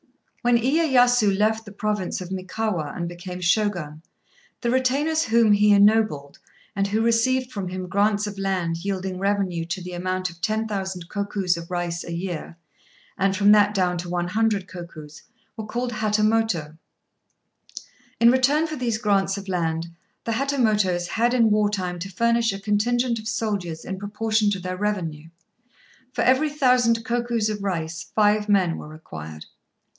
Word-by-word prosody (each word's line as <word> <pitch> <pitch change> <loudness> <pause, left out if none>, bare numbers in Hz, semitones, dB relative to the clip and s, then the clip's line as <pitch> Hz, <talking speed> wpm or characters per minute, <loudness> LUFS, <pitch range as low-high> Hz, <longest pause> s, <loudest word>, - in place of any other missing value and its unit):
When 240 -1 +4
Iyéyasu 245 -6 +3
left 220 +2 +1
the 205 - -10
Province 210 -2 -2
of 185 0 -8
Mikawa 185 -4 -3
and 170 -1 -3
became 175 +1 -7
Shogun, 175 -5 0 0.6
the 235 - 0
retainers 280 +5 +1
whom 225 -1 +4
he 205 0 +5
ennobled, 205 -8 +3 0.4
and 195 0 +1
who 215 +3 0
received 250 +3 +2
from 195 -3 -4
him 185 0 -5
grants 205 +2 +1
of 205 -1 -6
land 185 -4 -1
yielding 190 0 -4
revenue 195 -4 0
to 175 +2 -4
the 180 0 -7
amount 185 0 -2
of 170 +1 -18
ten 220 +3 0
thousand 190 -4 -4
kokus 200 -3 -1
of 170 0 -8
rice 175 -1 -3
a 170 - -6
year, 170 -1 -5 0.6
and 195 0 +1
from 205 +1 +5
that 210 0 +5
down 180 -2 +1
to 175 0 -6
one 175 0 -2
hundred 210 -1 0
kokus, 155 -4 -10 0.3
were 220 -2 -6
called 245 +2 -2
Hatamoto. 215 -7 0 1.4
In 235 +1 +7
return 275 +5 +3
for 310 -1 -4
these 240 -5 -1
grants 200 -2 +1
of 200 0 -8
land, 165 -2 -1 0.3
the 230 - -2
Hatamotos 215 -9 +1
had 240 +2 +1
in 230 -3 +4
war 210 0 +3
time 180 -3 -3
to 185 +3 -5
furnish 235 +3 +1
a 195 - -6
contingent 230 +4 0
of 220 - -8
soldiers 200 -8 -3
in 190 0 -5
proportion 215 +1 0
to 200 -2 -1
their 185 0 -5
revenue. 170 -7 -3 0.8
For - - -1
every 265 +5 +3
thousand 250 -5 +2
kokus 235 -2 0
of 210 -1 -4
rice 170 -4 -3
five 210 0 +3
men 185 -5 +2
were - - -9
required. 80 - -9
205 Hz, 160 wpm, -23 LUFS, 180-225 Hz, 1.4 s, In